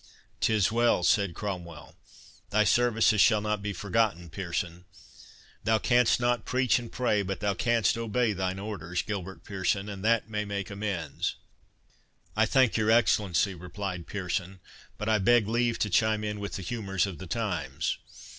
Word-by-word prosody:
"'Tis 110 -2 +2
well," 115 -5 +2
said 95 -1 +2
Cromwell; 90 -6 -6 0.5
"thy 110 +1 +3
services 115 -1 +3
shall 110 -3 +5
not 105 -1 -2
be 105 +1 -3
forgotten, 100 -3 -1
Pearson. 85 0 -4 0.8
Thou 110 0 +3
canst 120 +1 +3
not 120 -2 +1
preach 125 -3 +2
and 120 -1 -9
pray, 115 -5 +1
but 95 -1 -4
thou 100 -1 0
canst 115 +1 +2
obey 115 0 0
thine 95 0 -2
orders, 95 -3 -4
Gilbert 95 -3 -6
Pearson, 100 +1 -1
and 100 -2 -7
that 115 0 +2
may 105 -1 -2
make 100 -1 -4
amends." 100 -7 -3 1.0
"I - - +3
thank 130 -4 +3
your 110 0 +1
Excellency," 105 -5 +3
replied 90 0 -6
Pearson; 95 -1 -3 0.4
"but 105 - -4
I 110 -1 +3
beg 115 +2 +4
leave 120 +1 +1
to 105 - 0
chime 110 +3 +2
in 105 -1 -3
with 100 0 -5
the 95 - -4
humours 95 -3 -1
of 95 -6 -7
the 95 - -8
times. 85 - -2
105 Hz, 160 wpm, -28 LUFS, 95-110 Hz, 1.0 s, shall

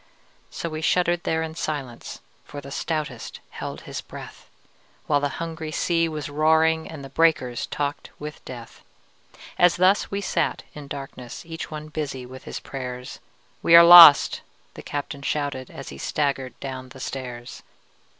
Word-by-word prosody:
So - - -5
we 155 -1 -5
shuddered 175 +1 +1
there 160 0 0
in 160 0 -5
silence, 145 -7 -5 0.2
For 145 - -9
the 140 0 -10
stoutest 155 +1 -4
held - - -6
his - - -6
breath, - - -11 0.6
While 145 -1 +2
the 145 0 -1
hungry 165 -1 -5
sea 165 +1 +1
was 150 -3 -5
roaring 160 +2 +2
And 145 -4 -8
the - - -10
breakers 150 -7 +1
talked 145 0 -3
with 150 +1 -8
death. 120 -3 -10 0.8
As 175 -1 +5
thus 185 +3 +3
we 200 - -2
sat 200 - -1
in 150 -2 -9
darkness 135 -3 -8
Each 165 0 -7
one 155 0 -7
busy 140 -5 -4
with 130 +1 -12
his - - -6
prayers, 125 -2 -7 0.4
"We 165 - +6
are 170 - +11
lost!" 170 -4 +10 0.3
the - - -10
captain 145 0 -5
shouted, 140 -2 -3
As - - -9
he 70 - -10
staggered 140 - -2
down 130 -1 -6
the 130 - -13
stairs. 125 -2 -7
150 Hz, 160 wpm, -24 LUFS, 135-160 Hz, 0.8 s, are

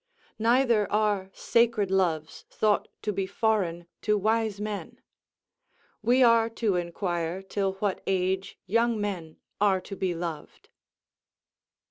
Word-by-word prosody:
Neither 235 -2 +3
are 210 -3 +1
sacred 230 -4 +1
loves 165 -5 0
thought 210 -1 +1 0.2
to 210 - -1
be 195 0 -2
foreign 190 -5 0 0.2
to 210 -1 +2
wise 220 0 0
men;... 210 -1 -5 1.0
we 245 +4 +4
are 230 -1 +5
to 225 -4 0
inquire 175 0 -2
till 195 0 -1
what 195 0 -2
age 190 0 0
young 230 +3 +2
men 180 -6 -4 0.2
are 195 -2 +4
to 195 - -8
be 185 -2 -1
loved." 165 -2 -6
200 Hz, 120 wpm, -27 LUFS, 185-220 Hz, 1.0 s, are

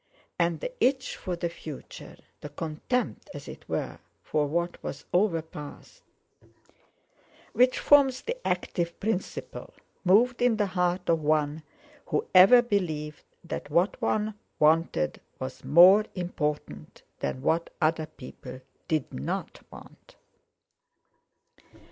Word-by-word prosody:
And 170 -1 +1
the - - -4
itch 260 0 +1
for 180 -2 -4
the 170 0 -2
future, 155 -4 -10 0.2
the 150 - -8
contempt, 160 - -3
as - - -9
it - - -11
were, - - -3 0.2
for 150 -1 0
what 170 +3 -2
was 140 - -6
overpast, 165 - -2 1.5
which 250 +1 +4
forms 270 -3 +4
the 485 - -3
active 170 -2 -2
principle, 205 -2 -4 0.3
moved 235 +7 +4
in 245 -3 +3
the 210 - +2
heart 180 -1 -1
of 165 -1 +3
one 150 0 +1 0.5
who - - 0
ever 220 +7 +8
believed 160 -9 -2 0.2
that 165 -3 -6
what 170 +6 +1
one 215 0 0 0.2
wanted 155 - +2 0.2
was - - -7
more 185 +6 +7
important 150 - -4 0.2
than 130 - -3
what 165 +1 +1
other 155 0 +1
people 130 -1 -11 0.3
did 155 -4 -1
not 65 +2 -4
want. - - -15
170 Hz, 120 wpm, -27 LUFS, 150-210 Hz, 1.5 s, ever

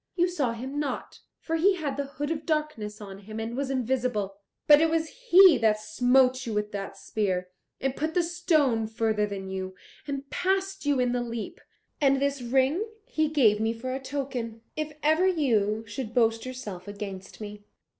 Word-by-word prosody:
You 350 0 +3
saw 290 -10 -1
him 260 +5 -5
not, 280 -4 -4 0.2
for 325 - -2
he 380 +4 +4
had 295 -6 -3
the 280 0 -2
Hood 290 +2 -4
of 315 -1 -2
Darkness 300 -10 -2
on 195 -1 -8
him 215 +2 -8
and 225 +1 -4
was 275 0 -2
invisible. 245 -6 -1 0.3
But 295 0 +8
it 325 - +4
was 320 0 0 0.2
he 365 - +8
that 215 -1 +3
smote 250 +4 +3
you 220 - -2
with 210 0 -1
the 195 -1 -4
spear, 185 -4 -2 0.3
and 270 0 -1
put 315 +3 -2
the 355 - +4
stone 310 -10 +2
further 220 -1 0
than 195 -2 -5
you, 190 0 -4 0.3
and 275 -1 -4
passed 385 -2 -1
you 285 -2 +3
in 250 -1 +2
the 245 0 0
leap. 235 -2 -5 0.4
And 275 -1 +4
this 280 -1 0
ring 265 - +2 0.2
he 310 0 0
gave 235 -9 +4
me 220 +1 +1
for 255 +3 -5
a 265 - -2
token, 260 -5 -4
if 310 0 -3
ever 315 +5 +4
you 225 - +1
should 225 +2 -6
boast 225 0 +2
yourself 205 -8 -7
against 200 -2 -7
me. 210 -1 -8
255 Hz, 185 wpm, -27 LUFS, 215-295 Hz, 0.4 s, But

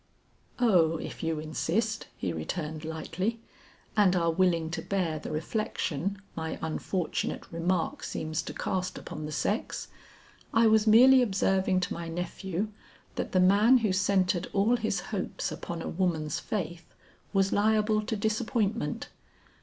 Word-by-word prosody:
"Oh 175 -9 +4
if - - -7
you 160 -1 -1
insist," 210 +8 -1
he 90 -3 -2
returned 155 - -4
lightly, 165 +7 -3 0.6
"and 200 -4 +4
are 170 -2 +2
willing 165 -2 +2
to - - -3
bear 175 -6 -1
the - - -7
reflection 175 +1 -2 0.2
my 160 -1 -3
unfortunate 165 +2 -2
remark 170 +1 -1
seems 155 0 -3
to - - -7
cast 185 0 -2
upon 155 0 -6
the - - -6
sex, 205 +8 -2 0.7
I 225 +1 +6
was 220 0 +4
merely 255 +4 +8
observing 190 -4 +2
to - - -2
my 170 0 -5
nephew, 180 +3 -3 0.4
that - - -3
the 185 - +3
man 205 +7 +6
who 195 - +2
centered 185 -2 +2
all 210 +4 +3
his 220 -4 -1
hopes 190 - -2
upon 170 -1 -5
a - - -4
woman's 165 -5 -1
faith, 170 -5 -5 0.4
was 195 -1 +2
liable 215 +1 +3
to 220 +1 -3
disappointment. 220 +1 -1
185 Hz, 140 wpm, -29 LUFS, 165-215 Hz, 0.7 s, merely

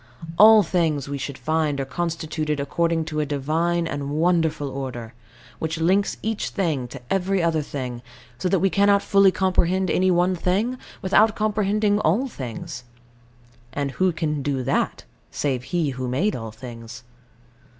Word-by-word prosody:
All 215 0 +9
things, 160 -5 0
we 140 0 -4
should 135 0 -5
find, 155 -3 0
are 135 - -1
constituted 155 -1 -3
according 165 +3 0
to 155 -1 -3
a 150 - +1
Divine 160 +5 0
and 145 -3 -4
Wonderful 160 -1 +1
Order, 130 -4 -6 0.5
which 160 +1 -2
links 190 +5 +2
each 220 -1 -2
thing 160 - -1
to 135 +3 -9
every 195 -1 +1
other 165 -2 +1
thing; 125 -4 -5 0.4
so 185 - 0
that 195 - +3
we 195 +1 +1
cannot 200 0 +3
fully 195 -1 +5
comprehend 185 -1 +1
any 185 +1 +2
one 180 +1 +3
thing 205 +9 0 0.2
without 210 +3 +4
comprehending 210 -1 +1
all 210 - +1
things: 130 - -7 0.9
and 140 -1 -2
who 185 +5 +1
can 155 -3 -2
do 135 -2 -1
that, - - -1 0.3
save 130 -4 -2
He 165 -2 -1
who 130 0 -4
made 150 +12 0
all 115 -2 -5
things? 115 +1 -10
160 Hz, 155 wpm, -23 LUFS, 140-190 Hz, 0.9 s, All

